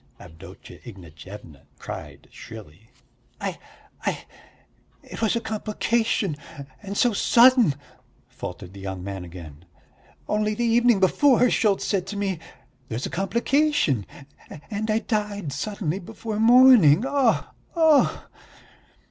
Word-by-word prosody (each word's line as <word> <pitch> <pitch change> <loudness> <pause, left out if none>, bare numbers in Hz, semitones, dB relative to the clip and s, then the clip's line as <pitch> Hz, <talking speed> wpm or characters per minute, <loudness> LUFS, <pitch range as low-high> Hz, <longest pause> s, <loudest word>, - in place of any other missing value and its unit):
Avdotya 80 0 -13
Ignatyevna 85 - -12
cried - - -9
shrilly. 110 -2 -13 0.5
"I... - - -4 0.4
I... - - -3 0.8
it - - -10
was 220 0 +1
a - - +1
complication, 215 -4 -1 0.4
and 200 -1 -6
so 240 -2 +3
sudden!" 235 - +5 0.5
faltered 90 +1 -9
the 100 - -11
young 95 -2 -6
man 95 -1 -6
again. 85 -3 -11 0.6
"Only 210 0 0
the 240 - -1
evening 235 -1 +3
before, 250 +6 +4
Schultz 205 -3 +1
said 190 -3 -1
to 205 - -6
me, 195 -4 -2 0.5
'There's 115 +4 -4
a - - -5
complication,' 235 - 0 0.6
and 215 +1 -3
I 215 - +2
died 205 - -3
suddenly 185 +2 -3
before 210 +3 -6
morning. 230 - +6
Oh! 275 -4 +1 0.2
oh!" 320 -3 +3
205 Hz, 115 wpm, -24 LUFS, -, 0.8 s, morning